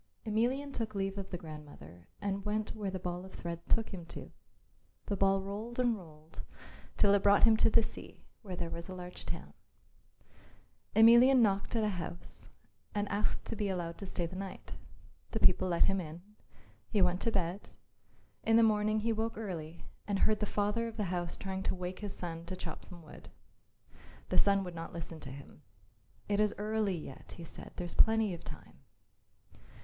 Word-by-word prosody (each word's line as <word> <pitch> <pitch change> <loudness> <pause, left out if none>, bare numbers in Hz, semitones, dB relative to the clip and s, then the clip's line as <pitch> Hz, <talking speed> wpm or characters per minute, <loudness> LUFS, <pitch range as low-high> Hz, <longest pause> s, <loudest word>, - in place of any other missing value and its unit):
Emelian 250 +6 +1
took 220 -4 -3
leave 195 0 -1
of 195 -1 -6
the 180 - -3
grandmother 145 - -11
and 200 -1 -2
went 215 +1 -1
where 210 -3 -2
the 190 - -3
ball 180 0 -4
of 190 - -11
thread 170 -1 -4
took 225 -1 +2
him 180 -3 -5
to. 165 - -9 0.7
The 200 - -1
ball 195 0 +3
rolled 210 +5 -5
and 245 -2 +3
rolled 160 -4 -11 0.6
till 200 -1 +5
it 200 - +4
brought 200 0 +5
him 225 -1 +8
to - - +5
the 225 +1 +5
sea, - - -8 0.2
where 190 -5 -6
there 170 -1 -3
was 170 +2 -6
a 185 - -5
large 180 0 -7
town. - - -5 1.4
Emelian 235 +3 +8
knocked 200 +1 +1
at 225 - +2
a 210 - +2
house 170 - -6 0.5
and 205 0 0
asked 205 +1 0
to 230 - -4
be 205 -2 -1
allowed 175 -3 -3
to 195 - -6
stay 175 -2 -1
the 175 +2 -7
night. 190 0 -6 0.6
The 220 - 0
people 185 -1 +5
let 170 -2 +4
him 195 -1 +1
in. 165 +1 -8 0.7
He 210 - +1
went 180 +1 +2
to 230 - +1
bed. 185 -1 -1 0.7
In 225 - +3
the 230 - +7
morning 215 0 +3
he 230 +1 +1
woke 225 0 -2
early 170 -6 -5 0.2
and 200 -1 +1
heard 215 +2 +3
the 210 - 0
father 210 +3 0
of 225 -1 -8
the 195 -4 -1
house 175 -1 -2
trying 190 -1 -3
to - - 0
wake 180 0 -5
his 205 -2 -4
son 165 -1 -5
to 185 +2 -4
chop - - -6
some 175 -3 -11
wood. 155 - -12 1.0
The - - +3
son 200 -1 +5
would 180 -2 -6
not 165 0 -6
listen 165 -1 -6
to 135 - -8
him. 140 +2 -11 0.7
"It 205 0 +1
is 210 -1 +3
early 210 -2 0
yet," 135 -4 -9
he 170 - -9
said, 165 - -10
"there's 175 -1 -5
plenty 220 -3 +4
of 170 - -8
time." - - -10
195 Hz, 195 wpm, -33 LUFS, 175-215 Hz, 1.4 s, him